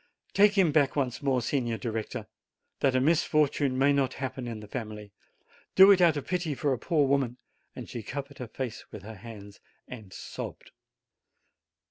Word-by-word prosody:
Take 205 +1 +5
him 180 -5 +5
back 145 -3 +3
once 130 -3 -1
more, 130 -4 +1
Signor 120 -2 -1
Director, 110 0 -4 0.5
that 135 -2 +2
a - - +4
misfortune 145 -2 +2
may 140 +2 +4
not 135 -2 +1
happen 130 -2 -4
in 115 -2 -5
the 105 - -10
family! 105 -3 -6 0.6
Do 190 +1 +9
it 190 -2 +5
out 165 -4 +5
of 145 - -4
pity 175 -5 -1
for 140 0 0
a 125 - -3
poor 150 +1 +2
woman!" 135 -3 +1 0.4
And - - -7
she 120 - -6
covered 140 +5 -7
her 125 - -5
face 120 0 -6
with 105 - -9
her 110 0 -9
hands 105 -2 -11 0.3
and 110 -6 -10
sobbed. - - -8
130 Hz, 175 wpm, -28 LUFS, 115-145 Hz, 0.6 s, Do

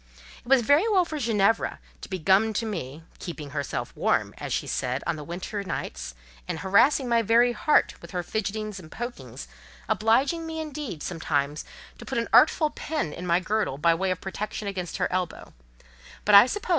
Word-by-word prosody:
It - - -21
was 265 -3 +5
very 290 - +4
well 375 -4 +4
for 310 -2 -5
Ginevra 225 -3 +1 0.2
to - - -9
be 190 - -2
gummed 195 +5 +3
to 230 - 0
me, 165 -8 -5 0.2
"keeping 155 -5 -7
herself 145 -2 -4
warm," - - +1
as - - -5
she - - -1
said, 130 +1 -2
on 170 - 0
the 150 - -7
winter 180 +6 -5
evenings, 65 - -5 0.3
and - - -4
harassing 245 +8 +4
my 235 -1 +3
very 235 +3 +4
heart 300 +5 +2
with - - -11
her 180 -2 -3
fidgetings 215 0 -3
and 160 -3 -13
pokings, 240 +1 -7 0.4
obliging 270 +10 +2
me, 320 0 -5
indeed, 295 - -5
sometimes 150 -4 -2 0.3
to - - -9
put 265 - -3
an 230 - -1
artful 310 0 +5
pin 300 - -3
in 180 - -6
my 170 +1 +3
girdle 205 -5 -1
by 165 +3 +3
way 190 +3 -1
of 185 -1 -1
protection 205 +2 -5
against 185 -3 -4
her 180 - +1
elbow; 185 -1 -3 0.7
but 210 - +3
I 200 +4 +10
suppose 415 +10 -4
M. - - -9
205 Hz, 195 wpm, -26 LUFS, 170-240 Hz, 0.7 s, I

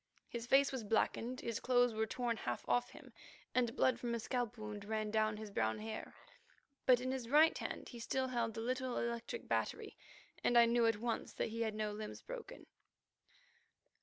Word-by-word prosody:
His 235 -1 -5
face 275 +2 +5
was 260 -4 -3
blackened, 230 +3 0
his 230 -1 -2
clothes 245 -1 +3
were 220 0 0
torn 240 0 -1
half 120 - -4
off 245 0 +2
him, - - -13 0.4
and 245 -1 +1
blood 255 -4 +3
from 240 -1 -1
a - - -2
scalp 245 0 -2
wound 210 -1 -6
ran 215 0 -2
down 215 -1 +2
his 215 -1 -7
brown 110 - +1
hair. 220 +1 -6 0.7
But 250 -2 +7
in 255 +1 -2
his 255 -3 -4
right 310 +4 +6
hand - - -5
he 240 - -9
still 260 +3 -1
held 235 -3 -1
the 225 - -3
little 255 +1 -1
electric 235 0 -3
battery, - - -1 0.5
and 240 - +4
I 235 - +9
knew 235 0 +3
at 225 -2 +2
once 230 +1 -2
that - - -1
he 230 +1 -4
had 220 -2 0
no 215 -1 -1
limbs 210 +1 -6
broken. - - -8
235 Hz, 195 wpm, -37 LUFS, 220-250 Hz, 0.7 s, I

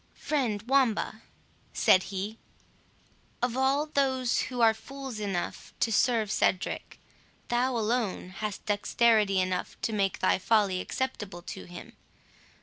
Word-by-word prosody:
"Friend 240 -9 -1
Wamba," 240 -3 +1 0.5
said 185 - +5
he, 200 +3 -4 1.0
"of 245 0 -1
all 270 +3 +2
those 265 -4 +1
who 250 -1 -5
are 225 -1 +6
fools 270 0 -8
enough 195 -4 -4
to 230 - +1
serve 225 -2 +2
Cedric, 185 -3 -1 0.5
thou 245 +1 +1
alone 220 -4 -1
hast 205 +2 -5
dexterity 210 -1 +3
enough 185 0 -2
to 225 - 0
make 195 -2 +1
thy 185 - +2
folly 200 -3 +2
acceptable 205 -10 -4
to - - -7
him. 175 0 -11
220 Hz, 125 wpm, -28 LUFS, 195-255 Hz, 1.0 s, are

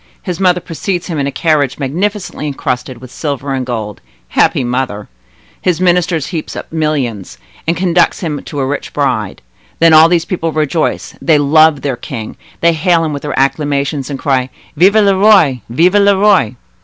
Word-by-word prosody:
His 180 -4 -4
mother 180 -2 +3
precedes 175 +2 -4
him 160 -4 -4
in 140 - 0
a - - -2
carriage 150 -4 0
magnificently 175 +4 -3
encrusted 125 -2 -3
with 130 0 -12
silver 140 -2 -4
and 130 -1 -2
gold. 110 -5 -5 0.3
Happy - - +2
mother! 120 -4 -3 0.5
His 180 -2 0
minister 180 -1 +2
heaps 160 +2 -5
up - - -8
millions, 130 - -2 0.3
and 165 0 +1
conducts 175 -1 +1
him 155 -5 -3
to 145 - -7
a 135 - 0
rich 140 +1 -4
bride. 120 - -2 0.3
Then 165 -1 +5
all 160 +1 +7
these 170 -1 +1
people 165 -3 -2
rejoice; 155 +1 -1
they 160 -2 +3
love 150 +1 +4
their 135 -4 -2
king, 115 -2 -7 0.3
they 170 0 +4
hail 165 +1 +2
him 155 - -3
with 140 - -5
their 150 - -4
acclamations, 140 0 -1
and 140 - -4
they - - -15
cry, 130 -2 +1 0.3
'Vive 185 +7 +4
le 200 -3 +4
Roi! 190 - +4
Vive 170 +10 +2
le 200 -1 +4
Roi! 190 - +3
150 Hz, 180 wpm, -14 LUFS, 135-175 Hz, 0.5 s, all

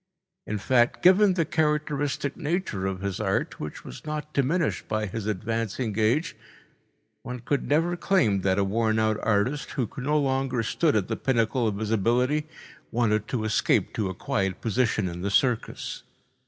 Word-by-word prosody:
In 105 - -2
fact, 120 +4 +2
given 190 +1 +6
the 165 -3 +1
characteristic 150 -2 0
nature 150 - -2
of 95 -1 -4
his 100 -2 -3
art, - - -1
which 75 - -7
was 60 - -9
not 150 0 -5
diminished 150 +4 0
by 110 0 -1
his 105 +1 -5
advancing 110 +2 -2
age, 120 +10 +1 0.9
one 125 0 -6
could 140 +3 -1
never 165 +4 +2
claim 120 - +2
that 95 0 +1
a 100 - +3
worn 110 +2 +1
out 110 -1 +1
artist, 115 +7 0
who 125 -4 -1
no 145 +4 +1
longer 135 -3 0
stood 155 +6 +1
at 100 -4 +1
the - - -2
pinnacle 120 -1 +1
of 105 -2 -1
his 110 0 -3
ability, 125 +8 +1 0.4
wanted 110 -2 +1
to 120 -4 -2
escape 110 -1 +1
to 105 -4 -1
a 95 - -5
quiet 95 -1 -1
position 110 -3 +1
in 85 0 -5
the 100 - -1
circus. 120 +3 0
115 Hz, 170 wpm, -26 LUFS, 105-145 Hz, 0.9 s, given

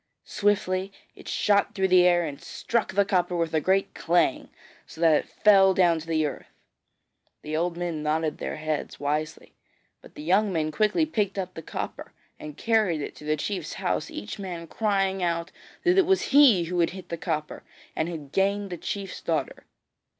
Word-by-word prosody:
Swiftly 195 -2 0 0.2
it - - -14
shot 205 0 +1
through 190 -1 +2
the 180 -1 +6
air 175 -1 +3
and 145 -3 -7
struck 235 -1 -2
the 200 0 +4
copper 180 -2 0
with 165 -2 -1
a 155 - +2
great 190 +4 +1
clang, 170 -5 +1 0.4
so - - -13
that 165 -1 +5
it - - -1
fell 195 -2 +5
down 175 -3 +3
to 160 - -11
the 160 -1 +1
earth. 145 - -5 1.0
The 155 +1 -4
old 170 +1 -1
men 170 -3 -3
nodded 155 0 -1
their - - -4
heads 155 -1 -4
wisely, 150 +2 -3 0.5
but - - -17
the 150 - -8
young 195 +5 +2
men 155 -3 -1
quickly 215 - +2
picked 210 -10 -1
up 185 -1 -3
the 165 - -8
copper - - -6 0.3
and 150 -1 -9
carried 215 -9 +1
it - - -4
into 150 - -14
the 155 0 0
chief's 180 +1 -4
house, - - -2
each 105 - -7
man 175 -4 -6
crying 195 0 0
out 170 -1 -1 0.3
that 365 +1 +4
it 365 - +3
was 385 -6 +1
he 265 -11 +7
who 175 +1 -3
had 170 - +3
hit 190 - -11
the 170 - -2
copper 155 -2 -3 0.3
and 160 +2 -1
had 150 -5 -7
gained 200 +1 0
the 175 - -4
chief's 195 +3 -5
daughter. - - -3
175 Hz, 190 wpm, -26 LUFS, 160-200 Hz, 1.0 s, he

